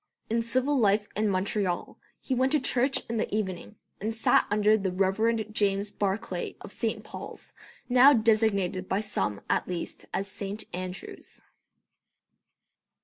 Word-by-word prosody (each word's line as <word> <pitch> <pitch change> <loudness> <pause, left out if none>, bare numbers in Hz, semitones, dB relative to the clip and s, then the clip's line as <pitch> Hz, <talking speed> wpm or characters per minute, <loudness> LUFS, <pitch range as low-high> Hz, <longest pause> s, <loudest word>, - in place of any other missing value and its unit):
In 230 +1 +2
civil 255 +4 +1
life 205 -1 +3
in 215 0 +1
Montreal 190 -1 -1 0.2
he 265 - -3
went 260 +1 +2
to 305 - +4
church 255 0 +2
in 230 - -2
the 220 - -1
evening, 205 -1 -3 0.3
and 220 +2 -2
sat 225 - +3
under 210 +1 +4
the 195 -3 -1
Reverend 215 +4 +1
James 200 -1 +1
Barclay 200 +1 -2
of - - -9
St. - - -2
Pauls, - - -9 0.3
now 255 +3 +7
designated 215 -6 +2
by 190 - +1
some 105 - -2
at - - 0
least 175 -2 -5
as 195 - -2
St. 200 +2 -4
Andrews. 185 +1 -7
210 Hz, 145 wpm, -28 LUFS, 195-230 Hz, 0.3 s, now